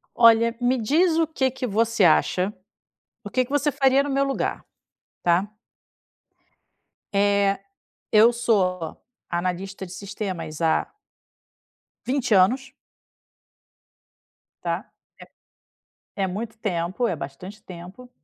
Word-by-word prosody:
Olha, 230 0 +5
me 250 +1 +2
diz 320 +8 +3
o 325 - +2
que 265 -4 0
que 260 -1 -4
você 225 0 +1
acha, 180 +4 +3 0.7
o 205 - -7
que 255 +3 +1
que 250 - -16
você 290 +1 +2
faria 270 -1 +3
no 285 - -4
meu 275 0 +2
lugar, 275 -1 -2 0.6
tá? 175 +3 +3 1.7
Eh, 200 0 +3 0.6
eu 220 +2 +7
sou 185 -8 0 0.3
analista 185 +2 -3
de 175 - -11
sistemas 185 -6 -6
há 160 -1 +2 1.2
20 255 -4 +1
anos 255 +8 +3 1.9
tá? - - -2 1.3
É 195 - -1
é - - +1
muito 220 +4 -5
tempo, 185 +2 -1
é 185 - -1
bastante 170 +9 -9
tempo 185 +8 -11
210 Hz, 110 wpm, -24 LUFS, 185-250 Hz, 1.9 s, eu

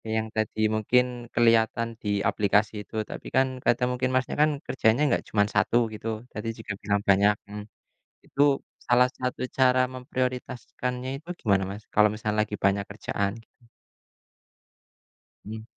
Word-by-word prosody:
yang 110 0 0
tadi 110 0 -2 0.2
mungkin 125 +4 +3 0.3
kelihatan 115 0 +3 0.2
di 105 - -2 0.2
aplikasi 105 +1 +2
itu - - -12
tapi - - -8
kan 130 0 +4 0.2
kadang 125 +1 +3
mungkin 130 +1 -1
Masnya 130 0 0
kan 155 - +5 0.2
kerjanya 120 0 +2
enggak 120 - +1
cuman 105 -1 +3
1 120 - +3 0.2
gitu. 110 +1 -7 0.3
Tadi 105 +2 -4
juga 105 -2 -5
bilang 100 0 +1
banyak 100 +2 +5
mhm. 105 0 -7 0.6
Itu 140 -1 +3 0.3
salah 125 +1 +5
satu 125 0 -3 0.2
cara 130 -1 +4
memprioritaskannya 125 0 -4
itu 170 - -15
gimana 100 -4 +2
Mas, 105 +2 -8
kalau 105 0 +5
misalnya 105 0 -2
lagi 105 - -5
banyak 100 0 +2
kerjaan, 100 -1 -2
gitu? 120 - -30 1.8
Hmm. 110 +1 -7
110 Hz, 145 wpm, -26 LUFS, 105-125 Hz, 1.8 s, kan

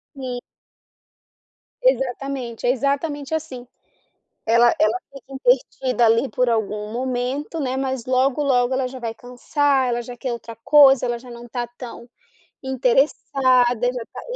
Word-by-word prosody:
Sim. 255 -2 -5 1.4
Exatamente. 270 - -1
É 245 - +4
exatamente 280 +3 -2
assim. 270 -6 -4 0.8
Ela 235 +1 +5
ela 320 +4 +2
fica 275 0 -13
entretida 265 - +1
ali, 230 +4 +3
por 250 +2 0
algum 210 -1 -2
momento, 255 +5 -3
né, 260 -1 -2
mas 265 -3 -2
logo, 260 +3 +1
logo 260 -2 +2
ela 260 0 0
já 260 +1 -7
vai 230 -2 -4
cansar. 260 +2 0
Ela 240 0 -1
já 245 +1 -9
quer 250 +1 -4
outra 230 -1 -7
coisa. 270 +2 +6
Ela 240 -1 -2
já 245 +1 -13
não 240 0 -10
tá 240 0 -3
tão 240 0 -10 0.6
interessada. 255 -2 +2
Já 245 -2 -5
tá - - -7
255 Hz, 140 wpm, -22 LUFS, 240-270 Hz, 1.4 s, coisa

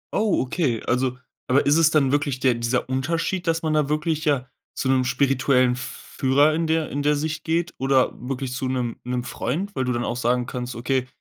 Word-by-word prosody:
Oh, 210 -1 +2
okay, 130 -3 -1
also 125 0 0 0.3
aber 130 +2 +3
ist 145 - +4
es 160 -1 +5
dann 145 -4 +2
wirklich 145 -2 0
der 130 -2 +3
dieser 115 +2 -1
Unterschied, 165 +7 -1
dass 165 0 +1
man 155 - 0
da 150 -2 +1
wirklich 155 +1 -1
ja 140 -4 +1 0.3
zu - - -2
'nem 130 -1 +3
spirituellen 130 -1 +2
F 130 +1 -7 0.2
Führer 145 +2 +4
in 165 0 0
der 160 -1 0
in 145 - -2
der 150 +1 +2
Sicht 155 +1 -3
geht 170 +1 -1
oder 135 -1 +2
wirklich 130 0 -4
zu 130 +1 -2
'nem 125 -2 -2
'nem 125 0 -2
Freund, 190 +12 -3
weil 130 - 0
du 125 - 0
dann 120 0 -1
auch - - -2
sagen 125 0 +1
kannst: 125 -1 -5
„Okay, 130 +2 -1
135 Hz, 215 wpm, -23 LUFS, 125-155 Hz, 0.3 s, es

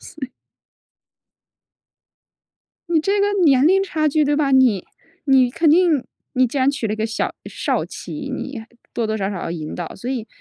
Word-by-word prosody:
所 320 -6 -8
以 260 - -11 2.6
你 335 -2 +2
这 395 +5 +1
个 400 - +3 0.2
年 275 -2 +5
龄 385 +3 +4
差 310 -5 0
距 300 +1 +2
对 290 +1 +1
吧？ 290 -2 +1
你 255 -8 +4 0.4
你 265 -3 +4
肯 320 +4 +2
定 325 -5 +3 0.3
你 255 0 +3
既 260 +4 -3
然 265 +1 +3
娶 280 -5 -3
了 210 - -2
一 - - -3
个 220 +1 -1
小 225 - -3
少 - - -1
妻， 290 -2 -7
你 270 -2 -6 0.3
多 230 -2 -1
多 220 - -1
少 195 -2 -2
少 200 - -5
要 - - -4
引 155 -2 -5
导。 175 -2 -6
所 240 +6 -6
以 245 -4 -3
270 Hz, 200 characters per minute, -20 LUFS, 225-310 Hz, 2.6 s, 年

